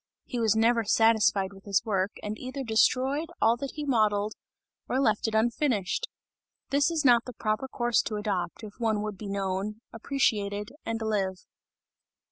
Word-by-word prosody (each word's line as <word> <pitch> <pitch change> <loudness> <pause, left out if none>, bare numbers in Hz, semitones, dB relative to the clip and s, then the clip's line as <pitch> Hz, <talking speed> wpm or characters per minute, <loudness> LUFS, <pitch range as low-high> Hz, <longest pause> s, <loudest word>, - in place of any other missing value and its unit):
He 245 - -4
was 220 -2 +3
never 230 +1 +3
satisfied 210 -3 +3
with 195 0 -15
his 200 +1 +1
work 195 -2 0
and 210 0 -3
either 260 +2 -5
destroyed 260 +7 +2
all 225 +1 +4
that 275 +2 -5
he 300 -1 -4
modeled 215 -5 +2 0.6
or 255 - +1
left 220 -5 +2
it 220 - -2
unfinished; 235 - +1 0.6
this 285 +2 +3
is 325 -4 -1
not 240 -2 +5
the 250 - -7
proper 215 +3 -2
course 240 -2 +1
to 215 - -3
adopt, 200 -2 -3
if 210 -1 -8
one 220 -3 0
would 215 -1 -4
be 205 - -6
known, 195 +2 -2
appreciated 210 -5 -1
and 225 0 -2
live. 195 -4 -1
220 Hz, 165 wpm, -28 LUFS, 205-245 Hz, 0.6 s, not